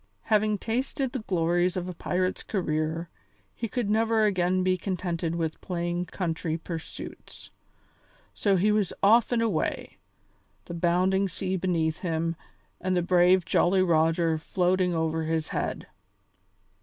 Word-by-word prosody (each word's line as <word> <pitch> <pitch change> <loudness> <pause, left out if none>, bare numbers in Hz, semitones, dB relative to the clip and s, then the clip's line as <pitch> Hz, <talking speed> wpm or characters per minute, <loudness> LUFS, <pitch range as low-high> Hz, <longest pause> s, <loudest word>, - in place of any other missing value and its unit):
Having 215 -1 +2
tasted 255 +5 -2
the 260 - -3
glories 175 0 +1
of 180 0 -3
a 180 - -5
pirate's 185 +2 -1
career, 160 -3 -2 0.5
he 230 - -4
could 235 0 -2
never 220 +1 +2
again 185 -2 +1
be 185 0 +2
contented 175 -3 -2
with 160 -2 -3
plain 175 0 -2
country 165 -2 -2
pursuits. 165 -1 -8 0.8
So 200 -2 +2
he 200 +4 +3
was 210 -4 +1
off 225 +4 +5
and 235 -1 +2
away, 210 -8 -2 0.7
the - - -7
bounding 185 +3 +2
sea 185 +2 -2
beneath 165 -4 0
him 165 -1 -1 0.4
and 185 -1 0
the 175 - +1
brave 180 0 +4
Jolly 185 +1 +3
Roger 165 -1 +2
floating 180 +1 +1
over 160 0 0
his 160 -1 -1
head. - - -3
180 Hz, 135 wpm, -27 LUFS, 165-195 Hz, 0.8 s, off